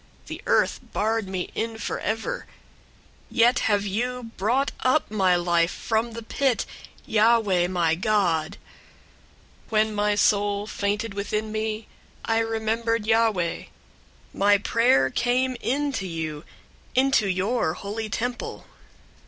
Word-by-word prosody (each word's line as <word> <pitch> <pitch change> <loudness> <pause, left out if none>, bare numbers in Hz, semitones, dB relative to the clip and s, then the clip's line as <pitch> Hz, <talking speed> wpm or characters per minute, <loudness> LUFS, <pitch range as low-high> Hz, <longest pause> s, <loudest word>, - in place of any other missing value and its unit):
The - - -7
earth - - +2
barred 220 0 -1
me 185 -1 -4
in 225 0 -3
forever: 220 +1 -3 0.8
yet 240 0 +4
have 205 -1 +2
you 235 +3 -3
brought 245 +8 +1
up 255 -1 +1
my 190 -4 +3
life 175 -1 +2
from 225 +3 -1
the 230 0 -7
pit, 260 +2 0 0.4
Yahweh 215 -5 +3
my 175 -3 +1
God. 175 -5 +1 1.1
002:007 - - -26
"When 215 0 +2
my 210 0 +1
soul 205 0 +2
fainted 210 +1 -2
within 210 +2 -3
me, 215 0 -3 0.4
I 225 0 +2
remembered 225 0 -1
Yahweh. 220 -6 +1 0.7
My 205 +1 +4
prayer 205 - +3
came 250 +2 +1
in 285 +3 0
to 195 -8 -3
you, 160 -3 -5 0.5
into 260 -5 +3
your 185 -2 0
holy 215 +3 -5
temple. 245 +3 -4
215 Hz, 120 wpm, -25 LUFS, 195-230 Hz, 1.1 s, yet